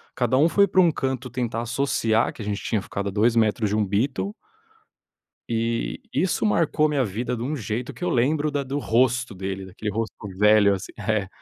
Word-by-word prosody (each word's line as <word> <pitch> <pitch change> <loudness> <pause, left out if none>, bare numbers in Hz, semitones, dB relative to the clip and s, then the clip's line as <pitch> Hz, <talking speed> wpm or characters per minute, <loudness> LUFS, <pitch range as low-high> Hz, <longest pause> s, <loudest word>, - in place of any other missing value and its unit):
cada 125 +1 +1
um 150 - +5
foi 200 +3 +4
para 185 +1 +4
um 170 - +4
canto, 130 -3 -3
tentar 120 -3 -2
associar 120 -2 +1
que - - -10
a - - -7
gente 100 -1 -3
tinha 110 - 0
ficado 100 +1 -4
a - - -5
2 110 +4 +2
metros 110 -1 +2
de - - +1
um 110 - +2
Beatle 120 - -1 1.2
eh, 115 0 -1
isso 190 +3 0
marcou 155 -6 +2
minha 140 -3 +1
vida 115 +5 -3
de 115 - -5
um 150 +4 -2
jeito, 115 0 -4
que - - -9
eu - - +1
lembro 145 +5 +1
da 145 -1 -2
do 135 +2 -3
rosto 120 +1 +1
dele, 95 +1 -4
daquele 100 +3 -5
rosto 115 +2 -3 0.2
velho 105 -1 +5
assim 95 0 -5
é, 105 -1 0
115 Hz, 205 wpm, -24 LUFS, 105-135 Hz, 1.2 s, um